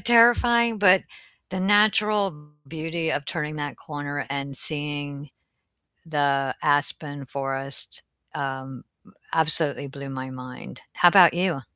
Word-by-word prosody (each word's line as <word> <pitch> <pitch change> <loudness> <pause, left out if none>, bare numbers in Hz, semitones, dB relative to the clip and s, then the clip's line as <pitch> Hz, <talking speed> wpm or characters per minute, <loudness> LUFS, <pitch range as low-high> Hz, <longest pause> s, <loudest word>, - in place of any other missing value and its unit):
terrifying, 235 -1 +4
but 190 -2 +5 0.5
the 185 0 -3
natural 205 0 +3 0.4
beauty 160 +1 -3
of 145 - -2
turning 155 -2 -4
that 145 -1 -5
corner 145 -2 -5
and 140 0 -4
seeing 145 -1 -1 0.8
the 140 -3 0
aspen 145 -1 -1
forest, 135 +1 -3 0.3
um, 135 -2 -5 0.5
absolutely 155 -3 +1
blew 140 0 -9
my 130 0 -6
mind, 125 -1 -10
how 175 - +6
about 180 -3 +7
you? 175 -6 -1
145 Hz, 110 wpm, -24 LUFS, 140-180 Hz, 0.8 s, about